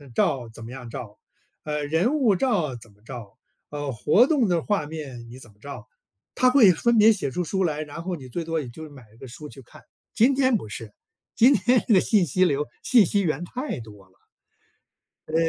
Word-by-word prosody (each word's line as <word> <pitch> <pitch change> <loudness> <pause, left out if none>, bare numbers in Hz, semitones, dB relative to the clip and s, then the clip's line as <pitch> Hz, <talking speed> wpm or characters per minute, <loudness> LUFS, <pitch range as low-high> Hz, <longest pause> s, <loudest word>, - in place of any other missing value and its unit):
照 125 0 0
怎 115 0 -12
么 115 - -9
样 125 -2 -9
照， 110 -3 -9 0.4
呃， 150 -1 -3
人 165 - +1
物 245 -9 +3
照 180 - 0
怎 115 -1 -15
么 105 - -29
照， 115 -3 -10 0.3
呃， 145 -1 -4
活 150 - +3
动 280 -8 +2
的 170 -2 +1
画 205 -5 -1
面 135 -7 -8
你 125 - -11
怎 120 -4 -13
么 100 - -28
照。 125 -3 -9 0.5
他 255 - +4
会 250 -7 +6
分 235 +7 +1
别 215 +1 +7
写 190 -10 -3
出 180 - -2
书 190 +4 -1
来， 155 -2 -2
然 155 +2 -9
后 180 0 -3
你 130 -3 -11
最 165 +7 -4
多 165 -1 -2
也 130 - -8
就 155 +6 -10
买 140 -3 -14
一 - - -21
个 130 - -11
书 145 +5 -10
去 135 - -13
看。 120 - -17 0.3
今 245 +5 +4
天 260 -2 +3
不 110 - -9
是， 105 0 -8 0.4
今 245 +5 +6
天 245 +2 +3
的 205 -4 +6
信 205 -5 +3
息 185 +5 +2
流、 145 -3 0 0.2
信 235 -6 +5
息 200 +4 +1
源 165 -3 -1
太 255 - -5
多 105 -3 -14
了。 - - -30 1.1
呃， 155 - -7
155 Hz, 230 characters per minute, -24 LUFS, 125-205 Hz, 1.1 s, 别